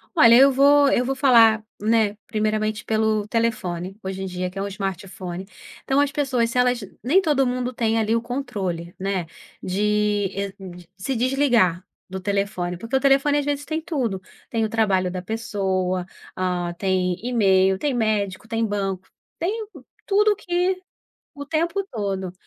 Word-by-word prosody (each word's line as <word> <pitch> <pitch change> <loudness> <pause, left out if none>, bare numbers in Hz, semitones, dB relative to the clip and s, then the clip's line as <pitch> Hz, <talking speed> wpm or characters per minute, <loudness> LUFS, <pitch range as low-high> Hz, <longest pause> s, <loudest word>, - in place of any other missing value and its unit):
Olha, 235 -7 +7
eu 270 +3 +7
vou 280 +1 +5
eu 250 - +2
vou 270 +2 -1
falar, 230 -5 +5 0.2
né, 215 -1 +2
primeiramente 215 0 -1
pelo 215 -1 +1
telefone, 200 -5 -2
hoje 190 0 -4
em - - -3
dia 180 -1 -3
que 185 - -13
é - - -2
um 200 - -2
smartphone. 190 -2 -5 0.4
Então 270 +1 +1
as 285 -1 +2
pessoas 260 -6 0
se 235 - -4
elas 250 -1 +3 0.2
nem 325 +10 +4
todo 295 -6 +2
mundo 250 0 -1
tem 225 -1 0
ali 220 0 +1
o 230 - +1
controle, 195 -9 -4
né, 190 -2 -1 0.4
de, 210 0 0
eh, 200 -1 -3 0.4
se 255 +8 -3
desligar 240 -8 +2 0.3
do 190 - -5
telefone, 195 -2 -2
porque 230 +8 -4
o - - +4
telefone 275 +2 +3
às 285 - -3
vezes 290 0 -2
tem 315 0 -3
tudo. 245 - -2 0.3
Tem 225 -1 0
o - - -3
trabalho 195 -5 +1
da 180 0 -4
pessoa, 190 -3 -2 0.3
ah, 180 -2 -2
tem 185 -2 0
email, 190 -5 +3
tem 285 +7 -1
médico, 215 -4 -1
tem 225 0 0
banco, 195 -3 -3 0.3
tem 430 +6 -2 0.4
tudo 420 +1 +3
que 370 -1 -1 0.5
o 285 - -7
tempo 335 +6 -1
todo. 195 -5 -3
220 Hz, 165 wpm, -23 LUFS, 190-265 Hz, 0.5 s, Olha